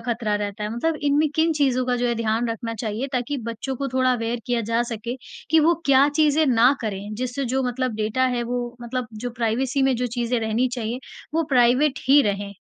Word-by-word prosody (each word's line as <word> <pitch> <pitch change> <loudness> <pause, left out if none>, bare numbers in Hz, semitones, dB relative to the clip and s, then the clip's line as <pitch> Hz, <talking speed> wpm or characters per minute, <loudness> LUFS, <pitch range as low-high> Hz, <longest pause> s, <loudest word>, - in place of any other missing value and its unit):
खतरा 230 -3 -1
रहता 205 0 -4
है? 210 - -3
मतलब 320 +7 0
इनमें 290 +1 +3
किन 320 +1 +3
चीज़ों 265 -4 +1
का 250 -1 +1
जो 245 0 0
है 235 - +1
ध्यान 230 +1 0
रखना 230 0 -4
चाहिए 220 +3 -3
ताकि 255 +3 -1
बच्चों 230 +4 -4
को 275 +2 -3
थोड़ा 255 0 +2
अवेयर 230 0 -2
किया 245 -1 +1
जा 230 +1 +3
सके, 235 +1 -5 0.3
कि 320 0 +6
वो 330 +3 +4
क्या 275 +1 +5
चीज़ें 300 +1 +3
ना 245 0 +5
करें 210 -1 -4
जिससे 255 +4 -3
जो 265 - +2
मतलब 250 -1 -2
डेटा 220 +4 0
है 240 - 0
वो 245 0 -3
मतलब 245 0 -3 0.2
जो - - -2
प्राइवेसी 245 +3 0
में 265 -1 +3
जो 250 +1 -1
चीज़ें 240 0 -1
रहनी 225 +3 +1
चाहिए, 235 0 -3 0.4
वो 330 - +3
प्राइवेट 255 +3 +4
ही 285 +2 +7
रहें? 200 -2 -2
245 Hz, 215 wpm, -23 LUFS, 230-265 Hz, 0.4 s, ही